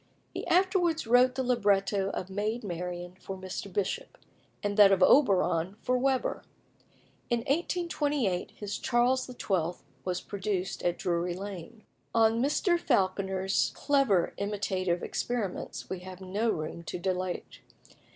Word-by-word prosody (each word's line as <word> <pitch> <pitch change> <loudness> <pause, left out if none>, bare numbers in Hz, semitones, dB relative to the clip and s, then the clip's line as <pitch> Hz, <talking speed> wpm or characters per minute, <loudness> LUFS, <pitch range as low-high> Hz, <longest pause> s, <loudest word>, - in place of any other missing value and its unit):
He - - -5
afterwards 355 -3 +2
wrote 250 +2 +5
the 260 - 0
libretto 200 -5 +2
of 185 - -4
"Maid 215 +4 -2
Marian" 180 -1 -5
for 190 0 -6
Mr. 190 +1 -6
Bishop, 200 +1 -2 0.5
and 205 0 -1
that 205 -2 +8
of 190 -1 +4
"Oberon" 190 - +4
for 255 - +1
Weber. 260 0 0 0.9
In 235 -1 +1
1828 290 - 0
his 205 0 -5
"Charles 250 +1 +2
XII." 185 -9 -2 0.2
was 180 -1 -1
produced 195 -2 -3
at 175 0 0
Drury 175 0 -1
Lane. 200 +3 -8 0.3
On 225 0 +4
Mr. 340 +6 +2
Falconer's 190 - +1
clever 270 - +2
imitative 190 -3 -1
experiments 225 -7 -3
we 190 - -4
have 185 0 -10
no 200 +5 -1
room 155 -3 -3
to - - -4
dilate. 185 0 -3
200 Hz, 130 wpm, -29 LUFS, 185-245 Hz, 0.9 s, that